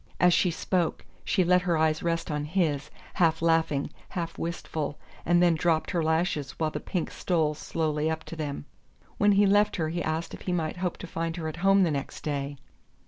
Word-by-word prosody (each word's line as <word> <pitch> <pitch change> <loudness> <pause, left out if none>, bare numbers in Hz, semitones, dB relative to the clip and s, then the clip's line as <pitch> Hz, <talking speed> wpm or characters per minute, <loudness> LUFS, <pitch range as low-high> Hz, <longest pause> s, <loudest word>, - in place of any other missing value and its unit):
As 180 -1 +5
she 180 - +3
spoke 175 0 -1 0.2
she 190 - +2
let 180 +1 +4
her 175 -3 +1
eyes 155 0 +2
rest 165 -2 -1
on 150 0 -1
his, 150 -4 0 0.2
half 165 -3 +3
laughing, 165 -4 +1 0.2
half 170 -2 -4
wistful, 160 -3 -4 0.3
and 175 +1 +5
then 175 -1 +5
dropped 160 0 +1
her 170 -4 0
lashes 160 -3 0
while 155 -1 -1
the - - -3
pink 180 -4 -3
stole 160 -4 0
slowly 155 0 -1
up 160 0 -3
to - - -8
them. 145 -3 -4 0.5
When 205 0 +5
he 200 +1 +5
left 205 +1 +4
her 160 -4 -1
he 175 +2 -2
asked 160 +1 -2
if - - -8
he 180 - -2
might 165 -1 -1
hope 180 -1 -2
to - - -7
find 165 -1 -3
her 160 -2 -3
at 155 - -5
home 195 +2 +4
the 170 - +2
next 140 -2 -4
day. 140 -1 -3
165 Hz, 205 wpm, -27 LUFS, 155-180 Hz, 0.5 s, As